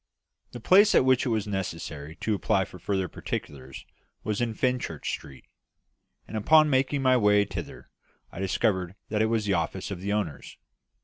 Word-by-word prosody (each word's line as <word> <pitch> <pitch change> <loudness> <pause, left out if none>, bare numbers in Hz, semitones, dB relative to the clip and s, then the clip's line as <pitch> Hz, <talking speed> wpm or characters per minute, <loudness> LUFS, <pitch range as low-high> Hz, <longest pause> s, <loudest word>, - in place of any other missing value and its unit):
The 120 - -7
place 190 - +5
at - - +5
which 130 +1 +3
it - - 0
was 110 -3 0
necessary 80 -6 -5
to 110 - 0
apply 95 -1 +1
for 90 - -13
further 95 +1 -1
particulars 65 -4 -7 0.4
was 105 +1 -2
in 115 -2 -1
Fenchurch 125 +1 -2
Street; 65 -2 -8 0.8
and - - -8
upon 155 +8 +5
making 135 +1 +1
my 130 -1 +5
way 105 -3 +4
thither, 95 -2 -8 0.4
I - - -9
discovered 95 -1 0
that 105 0 0
it 110 - +3
was 110 -1 0
the 100 - +1
office 90 +3 -2
of 90 -2 -5
the 100 +2 -3
owners. 100 -9 -3
105 Hz, 175 wpm, -27 LUFS, 95-120 Hz, 0.8 s, place